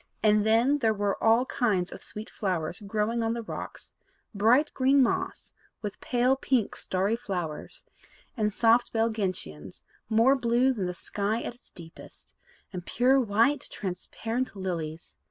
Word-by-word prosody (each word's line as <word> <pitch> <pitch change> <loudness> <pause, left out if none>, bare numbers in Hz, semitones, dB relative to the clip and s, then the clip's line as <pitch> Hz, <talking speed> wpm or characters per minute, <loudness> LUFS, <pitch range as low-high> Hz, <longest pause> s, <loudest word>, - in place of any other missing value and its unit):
And 210 -1 +4
then 235 +7 +3
there 220 -4 +2
were 205 -1 -1
all 225 +3 +4
kinds 205 -10 0
of - - -9
sweet 215 +2 -7
flowers 180 -6 -2
growing 215 +3 -1
on 225 0 0
the 235 - -4
rocks, - - -8 0.4
bright 230 +8 +3
green 270 +1 +4
moss, - - -2 0.3
with 210 - -5
pale 250 +1 +2
pink 260 -5 0
starry 195 +4 0
flowers, 190 - -5 0.5
and 210 -3 0
soft 230 +3 +3
belled 225 0 +1
gentians, 180 - -4 0.3
more 230 +5 +5
blue 250 +1 +2
than 195 -7 -2
the 180 - -4
sky 210 +5 -2
at - - -4
its 240 - -23
deepest, 165 -3 -12 0.4
and 180 -1 -5
pure 255 +7 +3
white 235 +5 +2
transparent 225 +6 -4
lilies. 170 -4 -5
220 Hz, 150 wpm, -28 LUFS, 195-245 Hz, 0.5 s, more